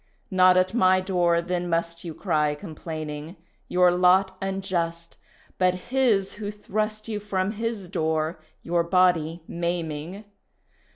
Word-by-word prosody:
Not 185 -1 +5
at 185 +2 +2
my 185 -5 +4
door 175 -3 +1
then 175 0 -2
must 170 0 -1
you 165 -3 -6
cry 150 -5 +1
complaining 155 -1 -7 0.3
Your 180 0 +4
lot 185 +2 +4
unjust, 175 -4 -3 0.4
But 185 -1 +3 0.2
His 235 -8 +2
who 205 - -3
thrust 215 +1 -3
You 215 -2 -3
from 195 -1 -1
His 225 -3 -4
door 160 0 -1 0.2
your 170 0 +1
body 170 -2 +2
maiming. 170 +2 -4
180 Hz, 125 wpm, -25 LUFS, 170-195 Hz, 0.4 s, Not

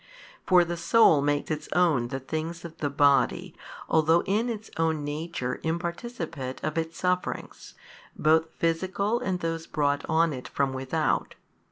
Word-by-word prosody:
For 180 -2 +6
the 170 0 -4
soul 170 -6 +5
makes 145 +1 0
its 155 - -4
own 160 -9 +3
the 135 +2 -4
things 160 +5 -5
of 165 -1 -9
the 145 - -1
body 140 -1 +2 0.3
although 160 +2 +3
in 215 +5 0
its 220 -1 -6
own 160 -2 0
nature 145 -3 -4
imparticipate 170 - -4
of 155 - -2
its 165 0 -3
sufferings, 180 0 -3 0.4
both 160 +1 +3
physical 190 +7 0
and 190 -8 -2
those 165 0 -3
brought 145 -2 0
on 160 0 +3
it 125 -1 -7
from 135 -1 -1
without. 135 +4 -1
160 Hz, 150 wpm, -27 LUFS, 145-175 Hz, 0.4 s, For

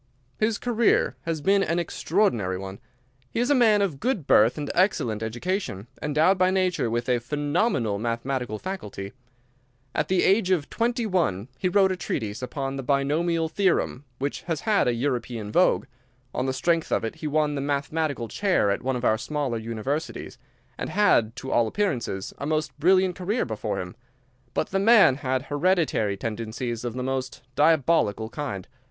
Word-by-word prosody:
"His 215 0 +1
career 235 -2 +2
has 165 -2 -2
been 195 +5 +3
an 170 -3 0
extraordinary 160 - 0
one. 95 +1 -7 0.5
He - - -3
is 245 +4 +1
a - - +7
man 220 -6 +4
of 160 -9 -2
good 235 - -1
birth 115 +2 +5
and 145 -1 -3
excellent 120 - +1
education, 120 - -3 0.2
endowed 155 +6 +2
by 185 0 +4
nature 185 -9 +1
with 120 +2 -2
a 125 -1 +2
phenomenal 145 - 0
mathematical 120 0 -2
faculty. 105 - -6 0.8
At 150 - 0
the 185 -1 +2
age 195 0 +3
of 170 -6 0
twenty 235 0 0
one 145 - 0
he 185 - -1
wrote 190 0 +4
a - - 0
treatise 115 - -4
upon 135 +1 -4
the - - -3
Binomial 155 +5 +1
Theorem, 180 -6 0
which 140 +2 -3
has 160 -3 -1
had 215 - +2
a 120 - +2
European 120 -4 -2
vogue. 180 +3 +3 0.5
On 130 - -1
the - - +1
strength 165 +4 0
of - - +1
it 115 - -5
he 155 - -4
won 150 0 +1
the 140 - -2
Mathematical 145 -2 -1
Chair 185 - +1
at 100 - -1
one 130 0 -1
of 125 0 -3
our 110 - +3
smaller 140 -3 -2
universities, 115 +7 -4 0.4
and - - -3
had, 115 - +3
to 135 - -6
all 115 -1 +3
appearances, 120 - -2
a 140 - -3
most 155 0 -1
brilliant 185 +2 +4
career 200 +7 -1
before 110 -2 -3
him. 90 +3 -6 0.6
But - - 0
the 195 - +1
man 205 - +6
had 130 -2 -1
hereditary 145 - +1
tendencies 115 +2 -4
of 120 -1 -4
the 125 - -3
most 130 0 -3
diabolical 145 -8 +3
kind. 115 -9 -5
145 Hz, 170 wpm, -25 LUFS, 115-185 Hz, 0.8 s, a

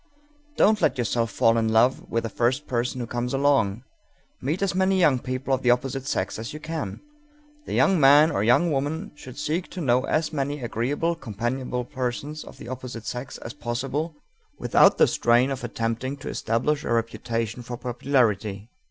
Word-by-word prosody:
Don't 210 0 +4
let 140 -5 +2
yourself 115 -1 0
fall 115 +2 +3
in 110 0 +1
love 115 +4 +3
with 115 - 0
the 115 - -3
first 125 +7 0
person 125 +1 -2
who 120 - -2
comes 120 +2 -2
along; 130 -6 +2 0.6
meet 155 +9 -1
as 195 - +1
many 190 +1 +2
young 145 -8 +4
people 130 +2 -3
of 130 - +1
the 125 - +2
opposite 135 +2 0
sex 105 -8 -2
as 115 +4 -6
you 150 - -6
can._ 155 0 -5 0.7
The - - -3
young 195 -3 +4
man 145 +3 +7
or 100 - 0
young 125 +10 +4
woman 150 +7 -2
should 130 -4 -12
seek 165 +4 -2
to 185 - -7
know 130 -5 +2
as 155 +1 0
many 145 0 -2
agreeable, 135 +9 -1
companionable 125 -1 -3
persons 130 +3 -4
of - - -13
the - - -10
opposite 125 -2 -7
sex 125 +1 -5
as 115 - -8
possible 135 +5 -3 0.4
without - - +4
the - - +6
strain 120 +3 +3
of 135 -1 -4
attempting 115 +4 -3
to 135 - -7
establish 140 +7 0
a - - -3
reputation 115 0 -2
for 120 0 -6
popularity. 115 -5 0
130 Hz, 180 wpm, -25 LUFS, 115-145 Hz, 0.7 s, man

